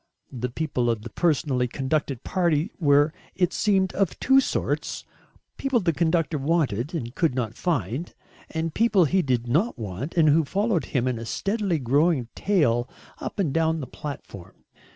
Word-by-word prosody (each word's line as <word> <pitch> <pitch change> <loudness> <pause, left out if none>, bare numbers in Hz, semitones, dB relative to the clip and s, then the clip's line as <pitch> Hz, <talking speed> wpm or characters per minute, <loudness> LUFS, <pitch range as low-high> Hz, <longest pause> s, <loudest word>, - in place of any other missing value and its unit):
The 125 -1 -3
people 125 -3 -1
of 110 -2 -1
the 120 - -8
personally 140 -6 +1
conducted 135 0 -2
party 170 0 +1
were, 145 -1 +4 0.2
it 180 0 +1
seemed, 190 -3 +2
of 185 -10 0
two 265 +1 +5
sorts; - - -2 0.5
people 270 -3 +1
the 175 -5 +1
conductor 160 0 +1
wanted 145 - 0
and 120 -6 -4
could 160 -4 +1
not 115 -4 -2
find, 140 - -2 0.4
and 160 0 -3
people 210 -6 +4
he 185 +5 +2
did 125 -5 -1
not 160 - +1
want 115 - -5
and 165 -3 +4
who 160 +2 +4
followed 200 - 0
him 130 -3 -1
in 125 -3 -1
a 115 - -6
steadily 195 - -1
growing 140 0 +2
tail 130 - +1 0.3
up - - -6
and 170 -9 0
down 160 0 +1
the 140 - -4
platform. 125 - -9
155 Hz, 165 wpm, -25 LUFS, 125-175 Hz, 0.5 s, two